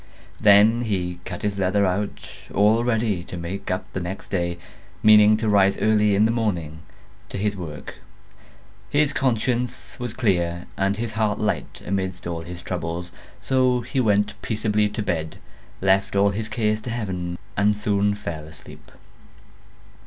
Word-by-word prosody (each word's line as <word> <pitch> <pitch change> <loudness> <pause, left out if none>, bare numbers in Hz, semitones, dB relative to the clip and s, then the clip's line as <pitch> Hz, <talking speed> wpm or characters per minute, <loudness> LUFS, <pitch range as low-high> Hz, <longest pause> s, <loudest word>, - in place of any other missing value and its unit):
Then 105 +3 +6
he 90 -6 -2
cut - - -6
his 100 -1 -1
leather 100 +2 +2
out, 95 +2 -2 0.3
all 105 +4 +4
ready 110 -6 0
to 90 - -7
make 95 +4 -5
up 90 0 -2
the - - -2
next 90 +2 -6
day, 85 -2 -1 0.5
meaning 105 0 +7
to 110 0 -2
rise 100 -2 +4
early 105 -1 +3
in 105 +2 +4
the 110 - +2
morning 90 -9 -2 0.5
to - - -5
his 100 +1 0
work. 80 -6 -8 0.9
His 150 0 +2
conscience 125 -1 -1
was 120 -2 -4
clear 85 -7 0
and 95 +1 0
his 115 -1 -3
heart 110 -2 0
light 105 - -2
amidst 95 -2 -2
all 85 -1 -3
his 85 +1 -8
troubles; 85 0 -4 0.3
so 130 -2 +2
he 130 +3 -3
went 105 -3 +1
peaceably 105 -1 0
to 105 +1 -4
bed, 80 -4 -2 0.4
left 95 +1 +2
all 100 0 +4
his 105 +2 -4
cares 110 -1 0
to 120 - -6
Heaven, 90 -7 -3 0.2
and 105 0 +2
soon 105 -1 +1
fell 85 -7 -6
asleep. 80 0 -12
100 Hz, 155 wpm, -23 LUFS, 90-110 Hz, 0.9 s, meaning